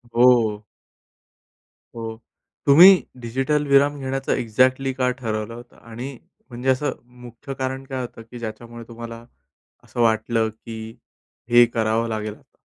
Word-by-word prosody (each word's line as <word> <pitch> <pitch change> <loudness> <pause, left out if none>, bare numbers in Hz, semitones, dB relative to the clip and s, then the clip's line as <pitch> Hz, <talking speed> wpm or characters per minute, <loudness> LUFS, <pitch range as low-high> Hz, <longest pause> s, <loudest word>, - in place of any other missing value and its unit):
हो. 115 -4 +4 1.3
हो. 115 -1 -6 0.5
तुम्ही 180 +7 +9 0.2
डिजिटल 135 +5 -1
विराम 140 +1 +4
घेण्याचं 135 0 -3
एक्झॅक्टली 130 +4 +1
का 130 -1 0
ठरवलं 115 -3 -4
होतं? 120 +1 -12
आणि 120 +3 -8 0.3
म्हणजे 125 +2 -3
असं 130 +2 +1 0.3
मुख्य 125 +4 -9
कारण 130 0 -4
काय 130 -1 -4
होतं? 120 -1 -8
की 120 +2 -11
ज्याच्यामुळे 115 +1 -8
तुम्हाला 115 0 -9 0.6
असं 120 - -6
वाटलं 110 0 +2
की 110 +1 -10 0.7
हे 120 0 +8
करावं 115 +1 +1
लागेल 105 -1 -3
आता. - - -26
120 Hz, 130 wpm, -22 LUFS, 115-130 Hz, 1.3 s, तुम्ही